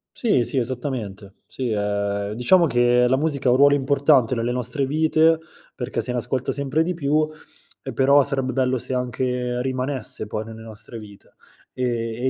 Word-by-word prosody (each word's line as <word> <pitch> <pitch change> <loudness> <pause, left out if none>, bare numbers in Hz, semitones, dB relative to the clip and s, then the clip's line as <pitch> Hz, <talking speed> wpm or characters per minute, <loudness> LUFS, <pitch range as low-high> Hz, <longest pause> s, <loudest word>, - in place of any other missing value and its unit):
Sì, 210 - +2
sì, 135 - -3
esattamente. 120 -6 -4
Sì, 130 -2 -4
ehm, 100 -1 -1
diciamo 145 +11 +4
che 120 -1 +3
la 130 - +3
musica 140 -2 -1
ha - - +5
un 125 - +4
ruolo 145 +1 +6
importante 140 -2 +3
nelle 115 +1 -1
nostre 125 +3 -2
vite 160 +2 +3 0.3
perché 125 - -3
se 120 +3 -3
ne 125 - -2
ascolta 125 +2 -2
sempre 140 +3 0
di 180 +2 -2
più, 155 -1 +1 0.6
e - - -7
però 140 +2 +5
sarebbe 135 -2 -1
bello 130 0 +1
se 130 - -3
anche 125 0 -2
rimanesse, 130 -3 -3
poi, 105 +1 -4
nelle 110 0 -10
nostre 110 +1 -9
vite. 105 -2 -15 0.4
Ehm, 130 - -2 0.4
e 130 - +2
125 Hz, 175 wpm, -22 LUFS, 115-140 Hz, 0.6 s, ruolo